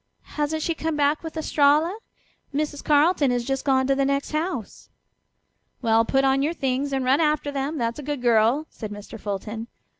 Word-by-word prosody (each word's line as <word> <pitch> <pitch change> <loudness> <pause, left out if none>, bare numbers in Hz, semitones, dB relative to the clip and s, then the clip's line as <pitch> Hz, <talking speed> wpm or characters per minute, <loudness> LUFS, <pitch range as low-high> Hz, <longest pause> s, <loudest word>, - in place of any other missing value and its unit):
"Hasn't 300 +1 -1
she 335 - 0
come 320 0 -3
back 295 +1 +2
with 325 -1 -7
Estralla? 305 +3 +3 0.6
Mrs. 295 0 -3
Carleton 300 0 +3
has 245 -1 0
just 270 +1 -2
gone 265 -2 +2
to 275 - +2
the 275 0 +1
next 275 +1 -1
house." 310 - -4 0.9
"Well, 225 0 +3
put 270 +3 +2
on 270 0 +3
your 310 +4 0
things 270 0 -1
and 265 -1 -1
run 270 +5 +3
after 300 -2 +1
them, 285 +3 -3
that's 230 +1 -2
a - - -6
good 290 0 -3
girl," 235 +5 +3
said 215 - -7
Mr. 205 +2 -9
Fulton. 210 +3 -5
280 Hz, 185 wpm, -24 LUFS, 250-300 Hz, 0.9 s, Estralla